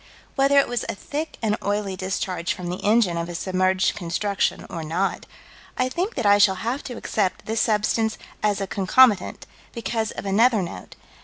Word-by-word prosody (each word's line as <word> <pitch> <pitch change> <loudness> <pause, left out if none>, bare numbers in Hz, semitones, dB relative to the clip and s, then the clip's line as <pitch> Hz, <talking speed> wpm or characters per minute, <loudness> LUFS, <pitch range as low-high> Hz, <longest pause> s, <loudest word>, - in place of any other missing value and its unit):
Whether 275 +1 +3
it 275 - +5
was 245 -1 -2
a - - -2
thick 300 +9 -5
and 215 -1 +1
oily 205 -1 -1
discharge 185 -2 -2
from 175 -1 -5
the 180 - -6
engine 210 -5 +3
of 170 +1 -3
a 175 - -6
submerged 185 +1 +1
construction 195 +3 -1
or 165 - -6
not, 175 +5 -2 0.5
I 255 0 +1
think 360 - -2
that 240 - -2
I 205 0 +6
shall 200 -2 +5
have 255 +5 -1
to 245 -3 -6
accept 195 -4 -1
this 220 0 0
substance 220 +1 +1 0.2
as 205 -1 +1
a 195 - -1
concomitant, 205 +3 +3 0.3
because 225 -1 -2
of - - -7
another 215 +2 +3
note. 95 - -8
205 Hz, 180 wpm, -23 LUFS, 185-230 Hz, 0.5 s, I